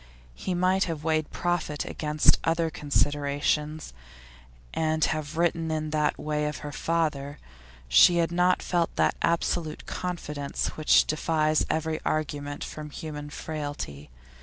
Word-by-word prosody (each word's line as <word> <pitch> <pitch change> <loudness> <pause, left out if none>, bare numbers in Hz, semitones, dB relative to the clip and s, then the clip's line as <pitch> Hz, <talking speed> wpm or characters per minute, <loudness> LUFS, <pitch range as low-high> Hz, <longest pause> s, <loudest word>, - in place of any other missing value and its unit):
He 180 - -3
might 185 +2 +3
have 160 -4 -4
weighed 155 -1 +1
profit 175 -4 -1
against 150 -1 +3
other 165 0 +1
considerations, 145 - 0 0.8
and 155 -1 +1
have 155 0 -3
written 165 -1 +1
in 155 -1 -2
that 150 -1 +1
way 150 0 -1
of 150 -3 -3
her 145 - -4
father; 150 -3 -1 0.5
she 70 - +7
had 170 0 +2
not 180 +1 +2
felt 175 -2 0
that - - +3
absolute 170 -1 0
confidence 150 -6 -3
which 155 - +4
defies 155 0 +1
every 160 0 -1
argument 145 -2 -2
from 150 -1 -7
human 150 0 -6
frailty. 145 - -5
155 Hz, 130 wpm, -27 LUFS, 150-165 Hz, 0.8 s, she